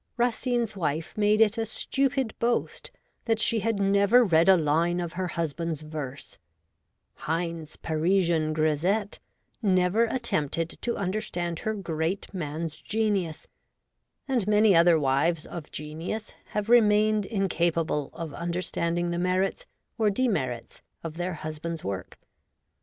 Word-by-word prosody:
Racine's 240 -2 0
wife 160 -3 -2
made 210 +1 +3
it 220 +1 +4
a 225 - 0
stupid 270 +1 0
boast 235 +1 -1 0.4
that 225 -1 +2
she 225 +1 +2
had 225 -1 -1
never 200 +5 +5
read 170 -3 +4
a 190 - +8
line 165 +3 +1
of 170 -2 -4
her 185 +1 -2
husband's 165 -1 -3
verse; 150 -3 -7 0.7
Heine's 165 -1 -3
Parisian 165 -1 +1
grisette 165 +7 0 0.4
never 190 +2 +3
attempted 165 - -1
to 235 - -1
understand 180 -4 -2
her 220 0 -2
great 170 0 -3
man's 155 -2 -4
genius; 205 -7 -1 0.8
and 245 -7 0
many 210 -2 +5
other 170 -1 +6
wives 150 +4 +1
of 165 -3 -8
genius 160 +9 -5
have 210 0 -3
remained 215 -3 +4
incapable 170 -7 0
of 165 -3 -6
understanding 170 0 -2
the 170 - -1
merits 185 - 0 0.3
or 215 -2 +4
demerits 195 - -1 0.2
of 165 -1 -6
their 175 0 -2
husbands' 155 +2 -5
work. 95 -1 -5
175 Hz, 125 wpm, -27 LUFS, 160-215 Hz, 0.8 s, a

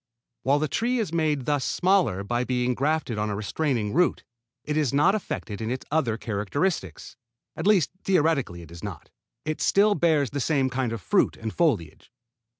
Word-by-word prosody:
While 140 +2 +3
the 155 +1 0
tree 240 - 0
is 205 -9 -2
made 155 -5 0
thus 145 -3 +1
smaller 180 - +2
by 120 +4 -1
being 125 0 0
grafted 140 -4 -1
on 105 0 -1
a 105 - -2
restraining 110 - -1
root, 175 +4 +2 0.4
it 150 - -3
is 150 -5 +1
not 150 +8 +4
affected 115 - -4
in 110 - -2
its 130 +1 -4
other 130 -8 +1
characteristics. 105 - -3 0.4
At - - -2
least 195 -8 +4
theoretically 150 - +1
it 80 - -14
is 85 0 -11
not. 100 -7 -7 0.3
It 155 0 -3
still 205 +1 +4
bears 155 - +2
the 145 - -3
same 135 -2 +1
kind 130 -2 -1
of 115 -3 -4
fruit - - +2
and 110 -1 -5
foliage. 135 - 0
140 Hz, 180 wpm, -25 LUFS, 110-160 Hz, 0.4 s, not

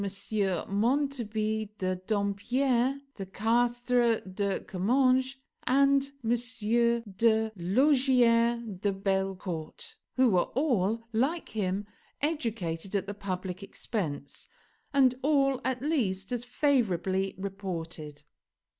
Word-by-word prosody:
Montarby 220 -2 0
de 185 -1 -1
Dampierre, 235 +7 0
de 195 - -6
Castres, 240 +2 +1
de 200 0 0
Comminges, 255 +7 +2 0.3
and 275 +1 +3
de 230 -2 +1
Laugier 235 - +3 0.2
de 205 +1 +1
Bellecourt, 195 - -3 0.2
who 260 -1 +4
were 180 -2 +2
all, 230 -5 +1
like 275 +10 0
him, 200 -1 -2 0.3
educated 215 - -2
at 195 -1 0
the 205 - -5
public 185 -2 -4
expense, 165 -8 -4 0.4
and 265 -3 +5
all, 275 -2 +2
at 255 0 -2
least, 210 -11 0
as 245 -1 -1
favorably 195 - +1
reported. 165 -6 -6
225 Hz, 95 wpm, -29 LUFS, 195-255 Hz, 0.4 s, and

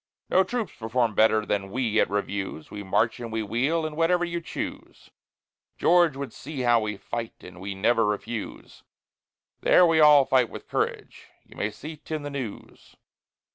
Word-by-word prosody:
No 190 - +5
troops 235 0 -3
perform 115 0 0
better 110 0 +3
than 100 -2 -2
we 115 -1 0
at - - +2
reviews, 100 -5 -4
We 105 - -6
march 110 +5 0
and 115 -2 -6
we 110 0 -2
wheel, 135 +10 0
and 155 -1 -5
whatever 175 +2 +2
you 170 0 -4
choose, 165 - -7 0.7
George 170 -4 +4
would 140 -1 -6
see 140 -1 -6
how 120 -1 +4
we 105 -2 -3
fight, 115 +2 -5
and 90 0 -11
we 100 +1 -5
never 115 +4 +2
refuse, 105 +1 -4 0.8
There 180 - +5
we 165 -2 +3
all 150 -3 +7
fight 130 -3 +3
with - - -10
courage - - -3 0.2
you - - -17
may 105 - -1
see 150 +9 -9
't 155 - -6
in 150 - -5
the 145 - -5
news. 130 -7 -8
120 Hz, 175 wpm, -26 LUFS, 105-155 Hz, 0.8 s, all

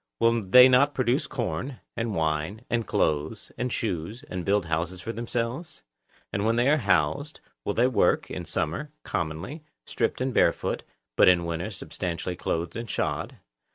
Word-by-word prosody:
Will 115 0 +3
they 125 +6 +8
not 135 +3 +4
produce 130 +3 +1
corn, 125 +1 -3 0.2
and 115 -3 -2
wine, 80 +8 -1
and 115 -1 0
clothes, 80 -6 0
and 125 0 -2
shoes, 105 - -3
and 90 -1 -4
build 100 0 +2
houses 85 +3 -2
for 115 +5 -5
themselves? 120 - -4 0.5
And 100 - 0
when 115 +1 +2
they 120 +2 +3
are 150 - +5
housed, 145 +1 +1 0.3
they 110 +4 +2
will - - +3
work, - - +2
in - - -5
summer, 85 - -2
commonly, 80 - -3 0.2
stripped 115 - -1
and 130 0 -1
barefoot, - - +2 0.3
but - - +6
in 90 -2 +5
winter 85 +4 -3
substantially 90 -3 -4
clothed 85 -1 -2
and 115 -1 -5
shod. - - -2
110 Hz, 160 wpm, -27 LUFS, 85-125 Hz, 0.5 s, they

